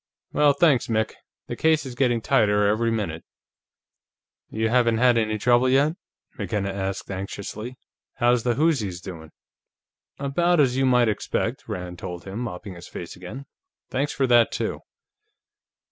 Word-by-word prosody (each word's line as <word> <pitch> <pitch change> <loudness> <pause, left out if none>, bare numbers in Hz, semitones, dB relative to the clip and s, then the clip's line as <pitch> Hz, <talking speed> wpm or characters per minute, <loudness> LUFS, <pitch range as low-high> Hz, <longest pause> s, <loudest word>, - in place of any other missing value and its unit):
Well, 150 -1 +4
thanks, 150 -6 +3
Mick. 110 -1 0 0.3
The - - -5
case 160 -2 +2
is 130 - -6
getting 120 -2 +1
tighter 105 -1 +3
every 110 +3 +2
minute." 100 -8 -2 1.3
"You 110 +1 -1
haven't 120 -1 +3
had 125 +1 +4
any 110 -2 +1
trouble 120 +3 +3
yet?" 140 +4 +3 0.5
McKenna 100 -3 -2
asked 95 0 -4
anxiously. 100 +5 -6 0.4
"How's 120 -1 +3
the 120 0 0
whoozis 130 - +1
doing?" 85 -4 -9 0.9
"About 170 +5 +1
as 130 -4 +3
you 135 0 +2
might 125 -2 +4
expect," 105 - -2
Rand 90 -1 -6
told 90 -1 -6
him, 100 +3 -6
mopping 105 -5 -6
his 85 0 -11
face 85 - -8
again. 105 +10 -9 0.5
"Thanks 140 +3 0
for 135 - 0
that, 120 -2 +4
too." - - -2
115 Hz, 145 wpm, -24 LUFS, 100-130 Hz, 1.3 s, Well